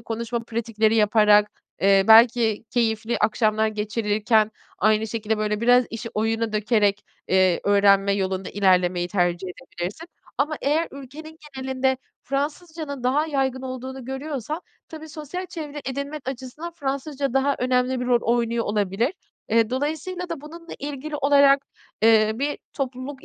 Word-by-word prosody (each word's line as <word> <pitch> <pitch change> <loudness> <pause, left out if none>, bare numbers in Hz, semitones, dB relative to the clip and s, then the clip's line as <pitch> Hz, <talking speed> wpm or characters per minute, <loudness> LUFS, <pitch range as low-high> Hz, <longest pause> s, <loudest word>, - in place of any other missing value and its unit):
konuşma 230 +1 -3
pratikleri 225 -1 0
yaparak, 210 -1 +4 0.3
eee, 195 0 +4
belki 225 -1 +6
keyifli 225 -1 0
akşamlar 215 0 +2
geçirilirken 215 0 +1 0.3
aynı 215 +1 +2
şekilde, 220 -1 -2
böyle, 210 0 -1
biraz 245 +1 +5
işi 230 +1 -5
oyuna 225 +1 0
dökerek, 210 -1 +1 0.2
eee, 185 -2 +3
öğrenme 200 -1 +4
yolunda 190 -1 -2
ilerlemeyi 180 -3 +2
tercih 175 -1 0
edebilirsin. 180 - -7 0.3
Ama 300 +2 0
eğer 305 +4 +1
ülkenin 300 +4 -11 0.2
genelinde 265 0 0 0.3
Fransızcanın 290 0 -4
daha 290 +5 +2
yaygın 265 -3 -1
olduğunu 260 0 -6
görüyorsan 280 +3 -4 0.3
tabii, 315 0 -9
sosyal 310 +5 -6
çevre 300 -4 -7
edinmek 280 +1 -5
açısından 265 +6 -6
Fransızca 275 -1 -3
daha 275 +1 +2
önemli 250 0 +1
bir 250 - -3
rol 240 -1 +3
oynuyor 235 0 0
olabilir. 210 - 0 0.4
Eee, 230 0 +2
dolayısıyla 315 +7 -3
da 330 -4 -5
bununla 335 +3 -11
ilgili 290 +1 -5
olarak, 280 -1 +4 0.4
eee, 220 -1 +5
bir 285 +5 -2
topluluk 265 0 -5
245 Hz, 130 wpm, -23 LUFS, 215-280 Hz, 0.4 s, belki